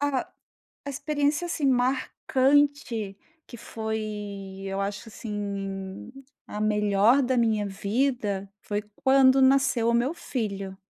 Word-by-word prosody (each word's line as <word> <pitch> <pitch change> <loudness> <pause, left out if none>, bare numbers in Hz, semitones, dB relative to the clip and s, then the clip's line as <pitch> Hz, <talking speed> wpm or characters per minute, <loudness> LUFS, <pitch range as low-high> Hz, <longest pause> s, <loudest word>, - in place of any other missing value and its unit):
Ah, 285 -3 -1 0.5
a 285 - -4
experiência, 290 +3 0
assim, 315 -4 -1
marcante 260 -2 +1 0.3
que 240 - -10
foi 210 -3 -5
eu 195 0 -3
acho 200 +3 -4
assim 200 -3 -5 0.4
a 210 - -6
melhor 210 +4 +3
da 255 0 +1
minha 220 -3 +2
vida, 205 -1 -1
foi 205 0 -3
quando 265 0 +5
nasceu 260 -3 +3
o 235 - +3
meu 245 +7 +1
filho. 200 - -4
225 Hz, 115 wpm, -26 LUFS, 200-270 Hz, 0.5 s, quando